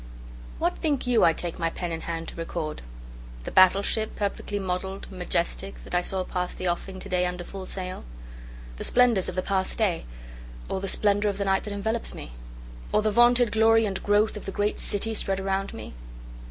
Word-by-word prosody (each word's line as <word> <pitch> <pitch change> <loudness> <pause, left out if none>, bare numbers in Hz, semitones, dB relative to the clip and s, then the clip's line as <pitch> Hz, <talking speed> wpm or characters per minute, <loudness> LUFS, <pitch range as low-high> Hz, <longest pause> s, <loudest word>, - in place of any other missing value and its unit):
WHAT - - -1
think 290 -5 0
you 245 -2 +3
I 165 - +7
take 170 +2 -3
my 165 -1 +1
pen 175 +1 -4
in 165 0 -3
hand 165 -1 -4
to - - -9
record? 165 -2 -4 0.6
The - - -6
battle 185 +1 +6
ship, 220 +1 0
perfect 205 0 -3
model'd, 190 -1 -3
majestic, 185 +1 -2
that - - -10
I 175 - +3
saw 185 +1 -2
pass 180 -1 -3
the 185 - -3
offing 185 +2 -3
to - - -7
day 180 -1 +1
under 180 0 -4
full 190 +1 -8
sail? 185 -1 -5 0.7
The - - -4
splendors 240 -6 +4
of 180 - -6
the 185 - -1
past 190 -1 -1
day? 200 -7 0 0.6
Or 190 - -2
the 195 - -2
splendor 205 +1 +3
of 200 - -3
the 200 - -1
night 195 0 +1
that 205 - -4
envelopes 220 +3 -1
me? - - -9 0.6
Or 210 - +3
the 215 - +2
vaunted 240 +1 +5
glory 225 0 +4
and 195 -2 -2
growth 210 +1 +2
of 210 - -7
the - - -2
great 205 +2 -1
city 220 +2 -1
spread 195 -2 +1
around 195 0 -1
me? - - -8
195 Hz, 205 wpm, -26 LUFS, 180-210 Hz, 0.7 s, I